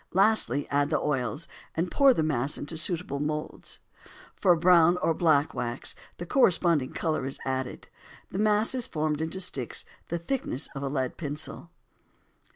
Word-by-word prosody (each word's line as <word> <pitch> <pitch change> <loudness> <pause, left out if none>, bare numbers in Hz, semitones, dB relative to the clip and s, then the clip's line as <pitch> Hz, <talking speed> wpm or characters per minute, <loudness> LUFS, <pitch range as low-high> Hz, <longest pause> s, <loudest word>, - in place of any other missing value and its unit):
Lastly 195 -7 +3
add 145 0 +1
the - - +1
oils, 140 +1 -1 0.3
and 170 +1 -1
pour 275 -1 +6
the 160 - +1
mass 140 -2 +2
into 145 +3 -6
suitable 160 -3 0
moulds. 150 +1 -4 0.6
For 180 -3 +4
brown 175 0 +5
or 165 -2 +1
black 155 -3 +2
wax 120 +1 -3 0.2
the 175 - -6
corresponding 170 - +3
color 155 -5 -1
is 135 - -3
added. 130 -1 -3 0.4
The 190 - -3
mass 215 +2 +3
is 250 -2 0
formed 155 -1 -1
into 160 +4 -3
sticks 135 -9 -1 0.2
the 170 - -2
thickness 170 - -2
of 135 - -6
a 140 - -2
lead 130 -3 -2
pencil. 155 +2 -5
160 Hz, 160 wpm, -27 LUFS, 140-180 Hz, 0.6 s, pour